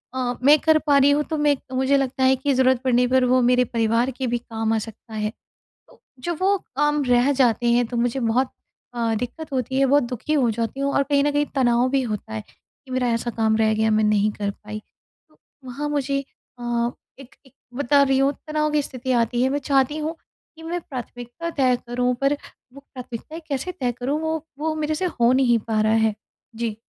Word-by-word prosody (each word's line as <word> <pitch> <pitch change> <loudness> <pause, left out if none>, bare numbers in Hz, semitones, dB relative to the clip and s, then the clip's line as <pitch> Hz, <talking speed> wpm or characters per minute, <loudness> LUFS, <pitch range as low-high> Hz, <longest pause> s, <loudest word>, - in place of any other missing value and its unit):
अ, 250 -1 -1
मैं 290 +2 +7
कर 315 -1 +4
पा 285 - +5
रही 280 +1 +5
हूँ 295 +1 +2
तो 315 - -1
मैं 295 -1 +3 0.2
मुझे 265 +2 +3
लगता 265 -1 -1
है 260 0 +5
कि 270 +2 0
ज़रूरत 260 -1 +3
पड़ने 250 -1 +3
पर 255 0 +3
वो 255 +1 +3
मेरे 250 +1 +3
परिवार 230 +2 +1
के 260 0 -4
भी 240 0 0
काम 225 -1 -3
आ - - +2
सकता 225 +1 -10
है। 215 -1 -1 0.6
तो - - -21 0.2
जब 345 -2 -2
वो 395 +1 +3 0.2
काम 295 +1 +2
रह 250 +2 +3
जाते 245 -3 +2
हैं 240 0 +3
तो 240 +1 -5
मुझे 245 +2 0
बहुत 245 +2 +1 0.4
अ, 230 -2 0
दिक्कत 250 +7 -5
होती 260 0 -1
है 275 - +4
बहुत 285 +2 +4
दुखी 250 +4 -4
हो 265 -6 +3
जाती 230 +4 -3
हूँ, 280 0 0
और - - +3
कहीं 280 0 +1
न 290 - +1
कहीं 290 0 +1
तनाव 245 -2 +3
भी 275 -1 +1
होता 210 - -5
है 110 - -4
कि 260 - -24
मेरा 255 -1 0
ऐसा 230 +1 -2
काम 220 -1 +2
रह 220 -1 +2
गया 220 0 +1
मैं 215 0 +3
नहीं 210 0 +2
कर 205 -1 -3
पाई। 210 +1 -8 0.5
तो 310 - -29 0.3
वहाँ 275 +4 -4
मुझे 275 -1 -1 0.3
अ, 240 0 -1 0.3
एक 270 -2 -14
एक 265 - -21 0.2
बता 285 +2 +3
रही 270 -1 +2
हूँ 275 +1 +3 0.2
तनाव 305 0 0
की 300 - +3
स्थिति 260 -1 -4
आती 240 0 +1
है 260 - +3
मैं 285 - 0
चाहती 275 +1 +1
हूँ 310 +2 -3 0.4
कि 325 - -13
मैं 345 +2 -3
प्राथमिकता 245 +3 -7
तय 260 -5 +2
करूँ 250 +1 0
पर 275 +1 +3 0.4
वो 280 - -11
प्राथमिकताएँ 255 +6 -8
कैसे 280 +5 -3
तय 250 -2 0
करूँ 275 +5 -1
वो 320 0 0 0.2
वो 315 +1 -1
मेरे 310 0 -1
से 370 - -2 0.2
हो 235 +1 +5
नहीं 255 -3 +3
पा 215 -1 +1
रहा 215 0 +2
है। 220 -1 +2 0.4
जी। 225 -2 -3
255 Hz, 220 wpm, -23 LUFS, 235-280 Hz, 0.6 s, मैं